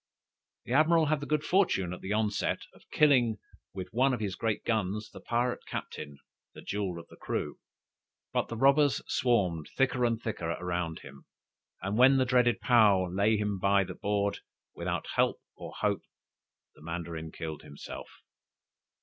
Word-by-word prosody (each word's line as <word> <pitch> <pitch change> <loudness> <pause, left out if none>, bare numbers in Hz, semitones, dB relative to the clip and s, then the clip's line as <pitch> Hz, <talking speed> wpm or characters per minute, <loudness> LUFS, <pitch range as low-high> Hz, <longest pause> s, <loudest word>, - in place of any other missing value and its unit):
The 120 - -3
Admiral 160 +3 +5
had 155 0 +1
the 145 - -6
good 150 0 +1
fortune, 135 - +2
at 90 - -8
the 95 - -5
onset, 105 -1 0
of - - -22
killing 125 -7 +4 0.3
with 95 -1 -6
one 130 +2 +3
of - - -7
his 100 -3 -2
great 110 +1 -2
guns 105 -1 -1
the - - -10
pirate 120 +1 -1
captain, 70 -1 -6 0.4
"The - - -10
Jewel 95 -4 -3
of 85 - -12
the - - -14
Crew." 75 - -3 0.7
But - - +1
the 115 - -5
robbers 140 +3 +4
swarmed 95 -11 +1
thicker 130 -2 +2
and 115 -2 +1
thicker 105 -8 -4
around 85 -2 -3
him, - - -13 0.6
and 100 +4 -1
when 135 +2 +7
the 130 - +3
dreaded 120 -2 +3
Paou 100 -7 +4
lay 105 +3 +3
him 105 -2 -1
by 100 +1 +3
the - - -7
board, 100 0 -1 0.3
without - - -3
help - - +2 0.2
or - - -8
hope, - - -1 0.7
the - - -20
Mandarin 80 -1 -5
killed 80 -2 -6
himself. 70 - -9
105 Hz, 165 wpm, -30 LUFS, 90-125 Hz, 0.7 s, when